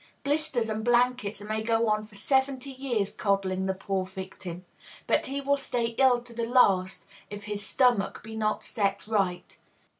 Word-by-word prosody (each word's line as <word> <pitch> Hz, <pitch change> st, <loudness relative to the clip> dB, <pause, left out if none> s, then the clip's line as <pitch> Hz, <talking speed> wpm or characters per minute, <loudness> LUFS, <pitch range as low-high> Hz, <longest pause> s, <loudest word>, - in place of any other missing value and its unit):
Blisters 285 Hz, -5 st, 0 dB
and 220 Hz, 0 st, -3 dB
blankets 240 Hz, -3 st, +2 dB
may 215 Hz, +1 st, -2 dB
go 225 Hz, +1 st, +1 dB
on 215 Hz, 0 st, 0 dB
for 210 Hz, -, -18 dB
seventy 265 Hz, +4 st, 0 dB
years 250 Hz, -7 st, -2 dB
coddling 190 Hz, -2 st, 0 dB
the 190 Hz, -, +1 dB
poor 195 Hz, 0 st, -2 dB
victim; 185 Hz, -1 st, -8 dB, 0.4 s
but -, -, +1 dB
he 275 Hz, +1 st, -2 dB
will 280 Hz, +1 st, +2 dB
stay 245 Hz, -4 st, -1 dB
ill 250 Hz, -3 st, +5 dB
to 240 Hz, -1 st, -10 dB
the 230 Hz, 0 st, -2 dB
last 195 Hz, -7 st, +3 dB, 0.2 s
if 205 Hz, 0 st, -7 dB
his 205 Hz, -1 st, -4 dB
stomach 240 Hz, -3 st, +2 dB
be 220 Hz, 0 st, -8 dB
not 215 Hz, -1 st, -1 dB
set 200 Hz, -2 st, -1 dB
right. 195 Hz, -5 st, -1 dB
220 Hz, 170 wpm, -28 LUFS, 200-250 Hz, 0.4 s, ill